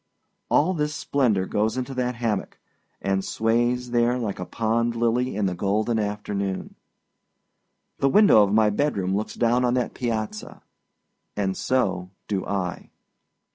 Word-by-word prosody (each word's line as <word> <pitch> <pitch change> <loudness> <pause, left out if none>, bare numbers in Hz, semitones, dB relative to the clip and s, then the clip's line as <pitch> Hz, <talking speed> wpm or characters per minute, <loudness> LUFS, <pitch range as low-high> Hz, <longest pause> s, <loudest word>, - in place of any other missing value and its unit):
All 180 +6 +3
this 150 -2 -1
splendor 125 -10 +1
goes 110 +5 0
into 130 +1 -3
that 125 -1 -1
hammock, 115 -4 -2 0.5
and 95 0 0
sways 120 +3 0
there 120 +1 +2
like 110 -5 -3
a 90 - -5
pond 115 +1 0
lily 120 +1 0
in 105 -1 0
the 95 - 0
golden 105 +5 0
afternoon. 100 -2 -3 1.3
The 135 - +3
window 200 - +6
of 100 -1 +3
my 105 0 +4
bedroom 100 -7 0
looks 105 +2 -3
down 120 +1 +2
on 125 0 +2
that 125 -2 -1
piazza 110 -4 -4 0.7
and 95 -2 -1
so 95 -8 0 0.2
do 100 -3 -1
I. 90 -3 -3
110 Hz, 140 wpm, -24 LUFS, 100-125 Hz, 1.3 s, window